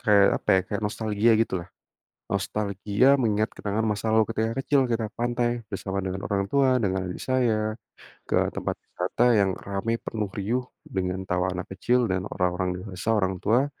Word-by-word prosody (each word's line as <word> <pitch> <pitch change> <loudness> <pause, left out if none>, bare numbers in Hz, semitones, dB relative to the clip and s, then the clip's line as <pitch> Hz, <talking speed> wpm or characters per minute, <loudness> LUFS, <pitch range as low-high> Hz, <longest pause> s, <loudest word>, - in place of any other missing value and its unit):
kayak 105 -4 +5
apa - - -29
ya - - +4
kayak 105 +1 -3
nostalgia 110 +1 +2
gitu 110 -5 0
lah, 85 - -11 0.6
nostalgia 105 +3 0
mengingat 110 -2 +1
kenangan 105 +2 -1
masa 105 +1 -1
lalu 110 0 +4
ketika 110 +1 0
kecil 135 +1 +3
kita 115 -1 0
ke 115 - -19
pantai 120 0 0 0.2
bersama 95 0 -3
dengan 95 0 -3
orang 100 -1 0
tua 135 -2 +4
dengan 95 -1 0
adik 90 - -6
saya, 110 -4 +1 0.5
ke - - +2 0.2
tempat - - -2
wisata 120 - -1
yang 100 -3 +3 0.2
rame, 100 +4 -1
penuh, 105 -3 -3
riuh, 115 +6 0 0.2
dengan 95 -1 -2
tawa 90 +1 +1
anak 90 0 -4
kecil 120 +5 +2
dan 95 0 0
orang-orang 90 0 0
dewasa, 95 +1 -7
orang 95 -1 0
tua, 120 +6 +3
105 Hz, 175 wpm, -26 LUFS, 95-115 Hz, 0.6 s, kayak